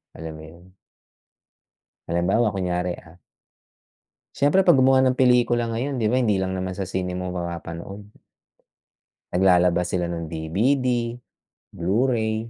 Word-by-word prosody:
alam 80 0 -7
mo - - -11
yun? 85 +3 -16 1.4
Halimbawa, 95 +7 +1
kunyari, 90 -1 -1
ah. 85 -1 -17 1.2
Syempre, 150 +7 +3
'pag 170 -7 +5
gumawa 130 0 +5
ng 130 - +3
pelikula 120 -1 +3
ngayon 130 +5 -2
'di 110 - +1
ba, 125 - +1
hindi 105 -5 +2
lang 95 0 -2
naman 95 0 -3
sa 95 - -3
sine 90 -1 -2
mo 90 0 -4
mapapanood. 85 +2 -6 1.3
Naglalabas 90 -1 +3
sila 90 -1 -1
ng 85 -1 -5
DVD, 120 - 0 0.5
Blu-ray, 110 +3 -1
95 Hz, 125 wpm, -23 LUFS, 90-120 Hz, 1.4 s, pag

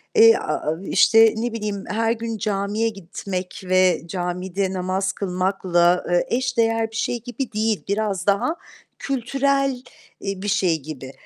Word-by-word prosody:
eee, 455 0 +8
aaa, 155 +2 -2
işte, 225 +2 +6
ne 235 +1 -2
bileyim, 210 -3 -3
her 225 +1 +1
gün 230 -1 -3
camiye 210 +2 -1
gitmek 185 -1 -6
ve 185 -2 +3
camide 185 +2 -2
namaz 185 +1 -1
kılmakla, 180 -2 +1
eee, 175 0 +3
eş 255 -1 -2
değer 225 -1 +2
bir - - -11
şey 235 0 -1
gibi 245 +1 -5
değil. 215 -1 0
Biraz 200 -2 -1
daha 205 +12 +2 0.4
kültürel, 275 0 0 0.4
eee, 195 -1 -4
bir 205 - -4
şey 185 -5 +2
gibi 135 -2 -8
200 Hz, 145 wpm, -22 LUFS, 185-230 Hz, 0.4 s, eee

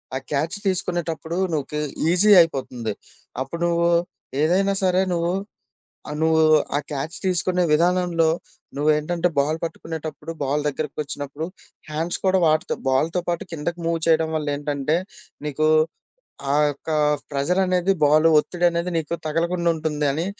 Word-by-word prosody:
ఆ - - +1
క్యాచ్ 155 +7 -1
తీసుకునేటప్పుడూ 170 -3 -2 0.2
నీకే 150 0 -2 0.3
ఈజీ 205 +4 +5
అయిపోతంది. 125 -8 -2 0.5
అప్పుడు 170 +5 -7
నువ్వూ, 170 0 +2 0.5
ఏదైనా 195 +4 +2
సరే 185 0 +3
నువ్వు 170 0 0 0.8
ఆహ్, 150 - -4
నువ్వూ 160 0 +4 0.3
ఆ - - +3
క్యాచ్ 150 +4 -4
తీసుకునే 180 0 +1
విధానంలో 175 -1 +2 0.5
నువ్వేంటంటే, 155 +4 +1
బాల్ 150 +3 +1
పట్టుకునేటప్పుడు, 160 -1 -6
బాల్ 145 +2 0
దగ్గరికొచ్చినప్పుడు, 145 +1 -4 0.4
హ్యాండ్స్ 160 +3 -2
కూడా 190 0 +4
వాడతవు. 155 0 +1
బాల్‌తో 160 +7 +1
పాటు 170 -1 -1
కిందకి 170 +2 -4
మూవ్ 165 0 +1
చేయడం 160 -1 +3
వల్లేంటంటే, 145 0 -1 0.5
నీకూ 155 +2 +1 0.8
ఆ - - +3 0.2
యొక్కా 155 +2 -4 0.3
ప్రెజరనేది, 180 +6 +1
బాలూ 155 +2 +5
ఒత్తిడనేది 175 +2 0
నీకు 160 +1 -2
తగలకుండుంటుంది 165 -2 0
అని 165 +5 -2
160 Hz, 120 wpm, -23 LUFS, 150-175 Hz, 0.8 s, ఈజీ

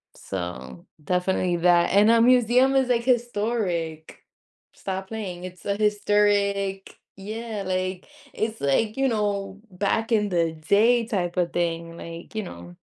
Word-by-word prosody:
So 85 -9 -7 0.2
definitely 180 +1 0
that 175 0 +3
and 205 +3 +5
a 230 0 +5
museum 250 +2 +4
is 265 -1 +2
like 235 -1 +2
historic, 210 -10 -1 0.5
stop 190 0 -5
playing. 185 -5 -6
It's 180 -1 -11
a 200 - 0
historic, 205 -2 +1 0.2
yeah. 215 +1 -5
Like, 185 0 -2 0.3
it's 220 0 -3
like, 210 - +1
you 270 0 +2
know, 200 -3 -2
back 205 +5 -1
in 210 -2 +2
the 165 -2 +1
day 215 +9 +3
type 185 -6 -2
of 175 -2 0
thing, 170 -1 -2
like, 170 +5 -9
you 215 - -2
know, 85 - -10
200 Hz, 140 wpm, -24 LUFS, 175-220 Hz, 0.5 s, and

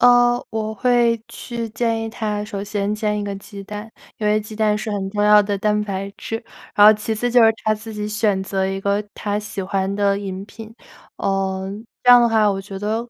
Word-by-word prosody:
呃， 245 0 +5
我 220 0 -3
会 235 0 +2
去 235 -2 -5
建 230 0 -1
议 225 - -3
他 210 -2 -3
首 200 -1 -5
先 205 0 -2
煎 210 -1 -1
一 205 - -3
个 200 -1 -3
鸡 200 0 -10
蛋， 210 +2 -7 0.3
因 215 - -1
为 210 +1 +3
鸡 215 +1 -9
蛋 215 -1 +2
是 215 +1 -4
很 195 -2 -3
重 205 0 -1
要 210 0 +7
的 205 0 -1
蛋 210 +1 +1
白 195 0 -4
质， 225 - -4 0.4
然 205 0 +7
后 215 - +10
其 215 +1 -3
次 240 +3 -1
就 240 -1 +6
是 225 - +6
他 215 0 +3
自 220 +1 -9
己 210 0 -3
选 205 -2 +1
择 190 0 -1
一 195 0 -3
个 200 +1 0
他 205 0 -2
喜 210 -2 -5
欢 195 +1 -1
的 200 -1 +1
饮 195 -1 -5
品， 220 +1 -11 0.4
呃， 190 -1 -1 0.3
这 245 - +6
样 245 0 +9
的 235 - +4
话 220 -2 +3
我 195 -1 -2
觉 195 0 -8
得， 220 +4 -2
210 Hz, 245 characters per minute, -21 LUFS, 200-225 Hz, 0.4 s, 后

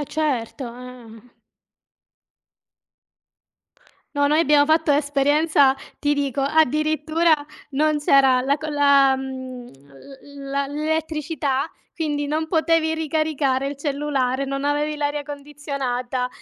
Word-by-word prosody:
E - - -2
certo 275 -4 -1
eh, 250 0 -10
mhmm. 225 +2 -15 2.8
No, 285 0 +2
noi 305 +2 +3
abbiamo 290 -2 +4
fatto 315 0 +2
un'esperienza, 285 0 +3 0.2
ti 290 0 +1
dico, 280 -2 -1
addirittura 310 +2 +2 0.4
non 300 +2 +1
c'era 270 -3 +4
la 280 +3 +1
co 315 - -6
la 280 -2 +4
mhmm, 260 -2 -7
l 270 - -13
la 280 0 -1
l'elettricità, 305 -1 -2 0.2
quindi 295 -3 -2
non 310 +2 -1
potevi 320 -1 +1
ricaricare 305 -4 0
il 285 - -6
cellulare, 275 -3 -1
non 275 0 -4
avevi 295 +1 0
l'aria 290 0 -2
condizionata 280 -4 -4
285 Hz, 115 wpm, -22 LUFS, 270-305 Hz, 2.8 s, abbiamo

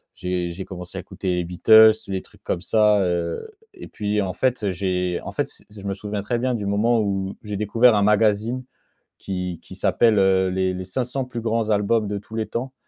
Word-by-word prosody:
j'ai 90 -1 -2
j'ai 90 +3 -6
commencé 90 -2 -8
à - - -3
écouter 90 -2 -3
les 90 - -1
Beatles, 110 +6 +7 0.2
les 95 -1 -3
trucs - - -23
comme 85 - -2
ça. 105 +1 +3
Heu, 85 - -2 0.3
et 360 - -10
puis, 105 0 -1
en 95 -2 -2
fait, 125 -4 0
j'ai 90 -1 -1
en - - -6
fait - - -1
c - - -17
je 105 -1 -12
me 100 - -1
souviens 105 +1 -4
très 120 +4 -2
bien 125 0 0
du 105 -3 -4
moment 110 +4 +2
où 95 -2 -2
j'ai 105 -2 -4
découvert 110 +3 +4
un 100 - +3
magazine 105 +4 +2 0.6
qui 90 -3 -4
qui - - -11
s'appelle, 115 -3 +3
heu, 95 -1 +3
les 95 0 0
les 90 0 -5
500 125 +7 -3
plus 125 -2 -6
grands 115 -1 -1
albums 105 +1 +2
de 100 0 -3
tous 105 +2 -10
les 110 -1 -2
temps. 130 +3 -4
105 Hz, 215 wpm, -23 LUFS, 95-110 Hz, 0.6 s, Beatles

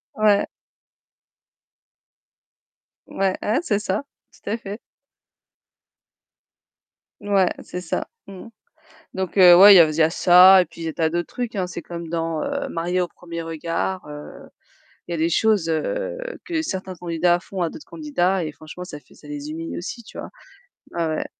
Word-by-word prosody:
Ouais. 210 -1 +3 2.6
Ouais, 190 -1 -1
ouais 220 +7 +1
c'est 205 -9 0
ça, 210 +5 -2 0.3
tout - - -10
à 220 - -1
fait. 205 -1 -8 2.4
Ouais, 195 -3 +2
c'est 180 - -6
ça. - - -3 0.2
Mmh 195 +1 -11
mh. - - -12 0.7
Donc 190 +1 -3
heu, 175 -2 +9
ouais, 200 +3 +10
il - - +8
y - - +9
a 165 - +8
aus - - -3
il - - -6
y 160 - +6
a 160 - +3
ça 185 +2 +7
et - - -3
puis 170 - -15
il 165 - -5
des 160 - -4
tas 160 -1 +1
d'autres 175 0 -2
trucs, 245 -2 -4
hein. 185 -3 -2
C'est 170 - -6
comme 170 -1 -8
dans, 165 -1 -2
heu, - - -3
Mariés 175 +2 -1
au 180 - +1
premier 170 -1 -8
regard, 165 +3 -3
heu, 150 0 -10 0.6
il - - -8
y - - -1
a - - -2
des 160 +2 +1
choses, 200 -1 +2
heu, - - -2 0.3
que 325 -2 -2
certains 190 - -5
candidats 175 +1 +1
font 190 +1 -7
à 170 - +1
d'autres 300 - -11
candidats 195 - -1
et 155 - -4
franchement 155 +4 -10
ça 150 -5 -9
fait - - -23
ça 150 - -17
les 145 0 -6
humilie 165 +1 -6
aussi, 205 +7 -6
tu 225 - -14
vois? - - -7 0.6
Ouais 170 -1 -1
ouais. - - -3
180 Hz, 185 wpm, -22 LUFS, 165-200 Hz, 2.6 s, ouais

